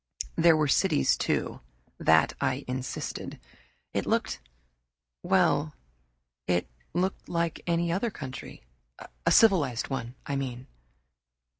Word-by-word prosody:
There 165 Hz, -1 st, +5 dB
were 155 Hz, -1 st, +2 dB
cities, 70 Hz, -, +3 dB
too; -, -, -1 dB, 0.4 s
that 80 Hz, 0 st, +4 dB
I 135 Hz, 0 st, 0 dB
insisted. 130 Hz, +1 st, -4 dB, 0.5 s
It -, -, -1 dB
looked -, -, 0 dB, 0.8 s
well, -, -, +2 dB, 0.7 s
it 90 Hz, -1 st, +1 dB, 0.3 s
looked 185 Hz, +2 st, -1 dB
like 170 Hz, -1 st, -1 dB
any 170 Hz, 0 st, +1 dB
other 200 Hz, +7 st, 0 dB
country 130 Hz, -, -8 dB, 0.6 s
a -, -, +5 dB
civilized 160 Hz, -, +4 dB
one, 120 Hz, -2 st, -4 dB
I 140 Hz, -, -2 dB
mean. 130 Hz, -2 st, -4 dB
140 Hz, 110 wpm, -28 LUFS, 125-170 Hz, 0.8 s, There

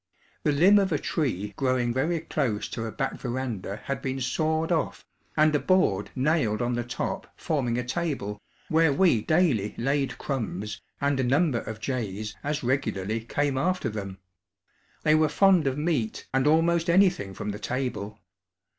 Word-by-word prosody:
The 150 Hz, -, +2 dB
limb 185 Hz, +8 st, +6 dB
of 195 Hz, -2 st, +1 dB
a 150 Hz, -, +2 dB
tree 105 Hz, -, -2 dB
growing 130 Hz, -3 st, +1 dB
very 155 Hz, +6 st, 0 dB
close 115 Hz, -8 st, -1 dB
to 115 Hz, -, -4 dB
a -, -, -5 dB
back 135 Hz, -, -3 dB
veranda 120 Hz, -6 st, -4 dB
had 140 Hz, -, -3 dB
been 135 Hz, 0 st, -2 dB
sawed 160 Hz, +5 st, 0 dB
off 165 Hz, -3 st, -1 dB, 0.3 s
and 155 Hz, 0 st, +5 dB
a 150 Hz, -, +3 dB
board 105 Hz, -, +2 dB
nailed 130 Hz, -6 st, +1 dB
on 120 Hz, 0 st, 0 dB
the 120 Hz, 0 st, -1 dB
top 120 Hz, -, -4 dB
forming 125 Hz, -7 st, 0 dB
a 125 Hz, -, -1 dB
table, 125 Hz, -8 st, -3 dB, 0.3 s
where 160 Hz, -1 st, +4 dB
we 140 Hz, -, +3 dB
daily 145 Hz, -, +2 dB
laid 135 Hz, +3 st, 0 dB
crumbs 105 Hz, -6 st, -4 dB, 0.2 s
and 140 Hz, -1 st, +1 dB
a -, -, +2 dB
number 135 Hz, 0 st, +2 dB
of 110 Hz, -1 st, -7 dB
jays 110 Hz, -4 st, -3 dB
as 150 Hz, 0 st, -2 dB
regularly 115 Hz, -5 st, -1 dB
came 135 Hz, +4 st, -1 dB
after 185 Hz, +5 st, 0 dB
them. 100 Hz, -3 st, -6 dB, 0.9 s
They 155 Hz, -, +4 dB
were 155 Hz, 0 st, +4 dB
fond 180 Hz, -1 st, +4 dB
of 135 Hz, 0 st, 0 dB
meat 150 Hz, -8 st, -1 dB
and 135 Hz, +2 st, +2 dB
almost 165 Hz, +2 st, +3 dB
anything 175 Hz, -, +3 dB
from 105 Hz, -, -4 dB
the 105 Hz, -, -6 dB
table. 110 Hz, -4 st, -3 dB
135 Hz, 165 wpm, -27 LUFS, 110-155 Hz, 0.9 s, limb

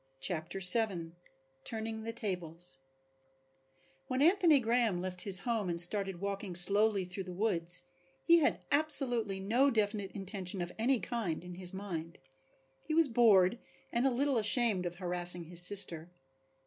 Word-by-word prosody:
CHAPTER 170 Hz, +4 st, -4 dB
VII 180 Hz, -3 st, +4 dB, 0.5 s
Turning 220 Hz, 0 st, -5 dB
the 230 Hz, -, -4 dB
Tables 175 Hz, -, -4 dB, 1.3 s
When 255 Hz, -, -3 dB
Anthony 335 Hz, -1 st, +3 dB
Graham 230 Hz, -5 st, -1 dB
left 180 Hz, 0 st, -5 dB
his 195 Hz, -2 st, +2 dB
home 225 Hz, -4 st, -3 dB
and 170 Hz, 0 st, -2 dB
started 195 Hz, +1 st, +5 dB
walking 200 Hz, -1 st, -6 dB
slowly 200 Hz, +2 st, +5 dB
through 185 Hz, +1 st, -8 dB
the 185 Hz, -, -9 dB
woods 180 Hz, -3 st, 0 dB, 0.4 s
he 340 Hz, 0 st, +4 dB
had 305 Hz, -, -2 dB
absolutely 255 Hz, -9 st, +1 dB
no 235 Hz, +8 st, +1 dB
definite 205 Hz, -4 st, -2 dB
intention 195 Hz, -1 st, -5 dB
of 175 Hz, 0 st, -5 dB
any 250 Hz, +2 st, 0 dB
kind 200 Hz, -10 st, -5 dB
in 180 Hz, -, -10 dB
his 180 Hz, 0 st, +1 dB
mind. 175 Hz, -4 st, -7 dB, 0.6 s
He 310 Hz, -, -5 dB
was 325 Hz, -2 st, +3 dB
bored 225 Hz, -3 st, +3 dB, 0.3 s
and 240 Hz, +3 st, 0 dB
a -, -, +2 dB
little 265 Hz, 0 st, -1 dB
ashamed 210 Hz, -4 st, 0 dB
of 175 Hz, -, -8 dB
harassing 175 Hz, -1 st, -2 dB
his 170 Hz, +1 st, 0 dB
sister. 180 Hz, -3 st, +2 dB
200 Hz, 150 wpm, -31 LUFS, 180-230 Hz, 1.3 s, started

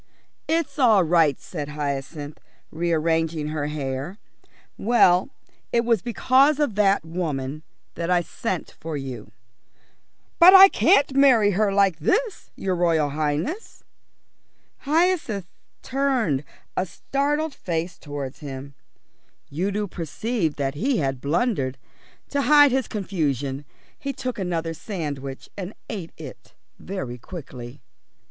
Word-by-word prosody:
"It's 325 Hz, -2 st, -1 dB
all 220 Hz, -7 st, +5 dB
right," 165 Hz, -4 st, +3 dB
said 150 Hz, -5 st, -6 dB
Hyacinth, 145 Hz, 0 st, -4 dB, 0.3 s
rearranging 160 Hz, -1 st, 0 dB
her 150 Hz, -1 st, -2 dB
hair. 145 Hz, +4 st, -4 dB, 0.6 s
"Well, 195 Hz, -2 st, +4 dB, 0.4 s
it 235 Hz, 0 st, +2 dB
was 230 Hz, -5 st, +2 dB
because 265 Hz, +5 st, +3 dB
of 290 Hz, -7 st, +1 dB
that 200 Hz, -3 st, +2 dB
woman 155 Hz, -4 st, -3 dB, 0.3 s
that 170 Hz, +1 st, -4 dB
I 180 Hz, -1 st, +3 dB
sent 185 Hz, +1 st, -4 dB
for 160 Hz, -1 st, -4 dB
you." 135 Hz, -3 st, -7 dB, 1.1 s
"But 365 Hz, +2 st, +9 dB
I 385 Hz, +1 st, +11 dB
can't 285 Hz, -10 st, +3 dB
marry 250 Hz, -7 st, +5 dB
her 205 Hz, +1 st, +1 dB
like 195 Hz, -4 st, +2 dB
this, 440 Hz, -, 0 dB
your 190 Hz, -1 st, -2 dB
Royal 165 Hz, -4 st, +2 dB
Highness." 155 Hz, -, -3 dB, 1.0 s
Hyacinth 310 Hz, -, +1 dB, 0.4 s
turned 250 Hz, -, 0 dB, 0.3 s
a 185 Hz, -, 0 dB
startled 290 Hz, -, -1 dB
face 170 Hz, -4 st, -4 dB
towards 145 Hz, -2 st, -6 dB
him. 140 Hz, -1 st, -8 dB, 0.8 s
Udo 200 Hz, +6 st, -1 dB
perceived 175 Hz, -, -3 dB
that 135 Hz, -1 st, -1 dB
he 245 Hz, -, 0 dB
had 135 Hz, -5 st, -1 dB
blundered. 145 Hz, -, 0 dB, 0.5 s
To 285 Hz, -, 0 dB
hide 290 Hz, -1 st, +6 dB
his 260 Hz, -1 st, 0 dB
confusion 145 Hz, -, -2 dB, 0.3 s
he 275 Hz, 0 st, -4 dB
took 255 Hz, -4 st, -4 dB
another 170 Hz, -3 st, -2 dB
sandwich 145 Hz, -7 st, -6 dB
and 195 Hz, +1 st, -6 dB, 0.2 s
ate 190 Hz, -7 st, -6 dB
it -, -, -11 dB, 0.2 s
very 130 Hz, -11 st, -5 dB
quickly. 130 Hz, -4 st, -9 dB
175 Hz, 120 wpm, -24 LUFS, 145-240 Hz, 1.1 s, I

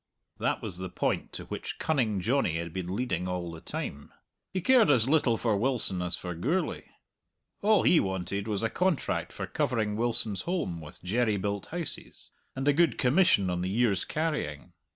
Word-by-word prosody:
That -, -, -1 dB
was 90 Hz, -, -4 dB
the 95 Hz, 0 st, -4 dB
point -, -, -1 dB
to -, -, -4 dB
which -, -, -5 dB
Cunning 115 Hz, -11 st, 0 dB
Johnny 115 Hz, -, +1 dB
had 85 Hz, -1 st, -5 dB
been 95 Hz, 0 st, -3 dB
leading 95 Hz, -7 st, -1 dB
all 90 Hz, -2 st, -3 dB
the 80 Hz, -1 st, -9 dB
time. 70 Hz, 0 st, -6 dB, 0.4 s
He 190 Hz, -, -1 dB
cared 235 Hz, -, +5 dB
as 125 Hz, -5 st, +5 dB
little 135 Hz, -6 st, +3 dB
for 110 Hz, -2 st, +1 dB
Wilson 110 Hz, -5 st, +3 dB
as 90 Hz, 0 st, +1 dB
for 90 Hz, -1 st, -5 dB
Gourlay; 150 Hz, -, -1 dB, 0.8 s
all 210 Hz, 0 st, +4 dB
he 170 Hz, -, +5 dB
wanted 95 Hz, +1 st, -2 dB
was 105 Hz, -1 st, -2 dB
a 115 Hz, -, +1 dB
contract 180 Hz, -4 st, 0 dB
for -, -, -5 dB
covering 110 Hz, -4 st, -1 dB
Wilson's 110 Hz, -3 st, -1 dB
holm 160 Hz, -, -2 dB
with 75 Hz, +1 st, -11 dB
jerry 110 Hz, +3 st, +1 dB
built 100 Hz, +1 st, -3 dB
houses, 170 Hz, -2 st, -6 dB, 0.2 s
and 135 Hz, +1 st, -3 dB
a 145 Hz, -, +6 dB
good 160 Hz, -4 st, +3 dB
commission 125 Hz, -, +3 dB
on 90 Hz, 0 st, -1 dB
the 90 Hz, -, -1 dB
year's 105 Hz, -2 st, +2 dB
carrying. 150 Hz, -, -3 dB
110 Hz, 180 wpm, -29 LUFS, 90-140 Hz, 0.8 s, a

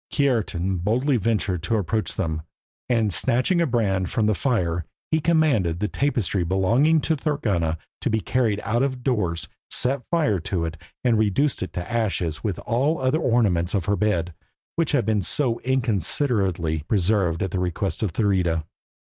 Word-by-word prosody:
Kiartan 105 Hz, -, 0 dB
boldly 120 Hz, -, +1 dB
ventured 100 Hz, -5 st, 0 dB
to 110 Hz, +7 st, 0 dB
approach 105 Hz, +3 st, -1 dB
them, 80 Hz, -1 st, -2 dB, 0.5 s
and, 115 Hz, -5 st, +2 dB
snatching 130 Hz, -, +2 dB
a 170 Hz, -, +2 dB
brand 100 Hz, -7 st, 0 dB
from 110 Hz, -, 0 dB
the 110 Hz, -, +3 dB
fire, 90 Hz, -8 st, 0 dB, 0.3 s
he 160 Hz, -, +3 dB
commanded 150 Hz, -, +2 dB
the 105 Hz, -, 0 dB
tapestry 110 Hz, -8 st, 0 dB
belonging 115 Hz, -, +3 dB
to 160 Hz, -, +1 dB
Thorgunna 105 Hz, -, -1 dB, 0.2 s
to -, -, -1 dB
be 110 Hz, -, +1 dB
carried 110 Hz, -3 st, 0 dB
out 115 Hz, +3 st, 0 dB
of 130 Hz, -2 st, -1 dB
doors, 95 Hz, -11 st, 0 dB, 0.2 s
set 130 Hz, +1 st, 0 dB
fire 150 Hz, -, +2 dB
to 85 Hz, 0 st, -2 dB
it, 80 Hz, 0 st, -4 dB, 0.3 s
and 120 Hz, -4 st, +3 dB
reduced 110 Hz, +7 st, +1 dB
it 95 Hz, -, -4 dB
to 90 Hz, 0 st, -4 dB
ashes 95 Hz, -9 st, -1 dB
with 100 Hz, -5 st, -1 dB
all 135 Hz, +7 st, +1 dB
the -, -, -7 dB
other 130 Hz, +5 st, +2 dB
ornaments 105 Hz, -, +2 dB
of 95 Hz, -4 st, 0 dB
her 100 Hz, 0 st, +2 dB
bed, 90 Hz, -4 st, 0 dB, 0.4 s
which 165 Hz, -3 st, 0 dB
had 145 Hz, -, +2 dB
been 110 Hz, -2 st, +1 dB
so 120 Hz, +4 st, 0 dB
inconsiderately 100 Hz, -, 0 dB
preserved 95 Hz, -4 st, +1 dB
at 95 Hz, -, -2 dB
the 95 Hz, -, -1 dB
request 90 Hz, +2 st, -2 dB
of 105 Hz, -5 st, 0 dB
Thurida. 90 Hz, -5 st, +1 dB
105 Hz, 170 wpm, -24 LUFS, 90-130 Hz, 0.5 s, the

